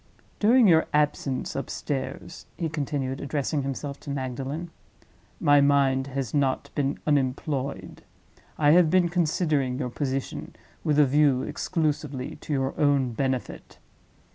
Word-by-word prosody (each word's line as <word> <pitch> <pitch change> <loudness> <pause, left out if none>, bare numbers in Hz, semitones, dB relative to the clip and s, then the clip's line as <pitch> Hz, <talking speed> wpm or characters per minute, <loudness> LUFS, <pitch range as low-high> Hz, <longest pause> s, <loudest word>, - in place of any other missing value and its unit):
During 230 +2 +5
your 160 -3 +5
absence 145 -3 0
upstairs," 135 +1 -5
he 165 - -2
continued, 140 -3 -3
addressing 145 +1 -1
himself 140 +1 -5
to - - -10
Magdalen, 140 +5 -4 0.7
"my 145 0 +5
mind 140 -2 +3
has 135 -3 -4
not 140 -1 0
been 140 -1 -1
unemployed. 140 -1 -1 0.6
I 145 -1 +4
have 170 0 +6
been 175 0 +3
considering 155 -6 0
your 130 -2 -2
position 135 0 -4 0.3
with 150 -2 +1
a 150 - +7
view 140 -1 +3
exclusively 150 -6 -2
to - - -9
your 135 -1 0
own 140 -4 +3
benefit. 130 +1 -3
140 Hz, 125 wpm, -26 LUFS, 135-150 Hz, 0.7 s, a